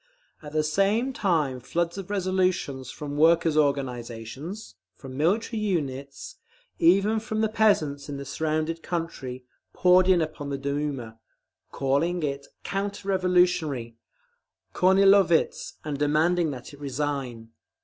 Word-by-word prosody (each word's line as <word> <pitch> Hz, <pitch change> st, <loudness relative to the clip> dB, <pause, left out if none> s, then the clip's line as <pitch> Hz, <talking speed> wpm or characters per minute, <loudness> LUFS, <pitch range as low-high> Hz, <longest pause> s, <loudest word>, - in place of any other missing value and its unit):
At 150 Hz, -1 st, -10 dB
the 155 Hz, 0 st, +2 dB
same 200 Hz, -, +1 dB
time 155 Hz, -, 0 dB
floods 170 Hz, +7 st, -2 dB
of 195 Hz, -1 st, -7 dB
resolutions 185 Hz, -9 st, -1 dB
from 145 Hz, +1 st, -6 dB
workers' 165 Hz, 0 st, +4 dB
organisations, 135 Hz, -, -2 dB, 0.2 s
from 130 Hz, -1 st, -10 dB
military 205 Hz, -, 0 dB
units, 140 Hz, -8 st, -3 dB, 0.4 s
even 195 Hz, +6 st, +4 dB
from 215 Hz, 0 st, -3 dB
the 220 Hz, -, +3 dB
peasants 200 Hz, -11 st, +1 dB
in 140 Hz, -, -4 dB
the 140 Hz, -, -7 dB
surrounding 155 Hz, +3 st, -1 dB
country, 160 Hz, -7 st, -5 dB, 0.3 s
poured 180 Hz, 0 st, +5 dB
in 185 Hz, -2 st, +5 dB
upon 155 Hz, -3 st, -3 dB
the 140 Hz, -, -2 dB
Duma, 140 Hz, -5 st, -3 dB, 0.5 s
calling 155 Hz, +6 st, 0 dB
it 140 Hz, -1 st, -3 dB, 0.2 s
"counter 200 Hz, 0 st, -3 dB
revolutionary, 180 Hz, -10 st, +1 dB, 0.8 s
Kornilovitz," 190 Hz, -2 st, +4 dB
and 145 Hz, -2 st, -3 dB
demanding 160 Hz, +3 st, +2 dB
that 130 Hz, -1 st, -8 dB
it 145 Hz, -, -13 dB
resign. 135 Hz, -5 st, -4 dB
155 Hz, 120 wpm, -26 LUFS, 140-185 Hz, 0.8 s, poured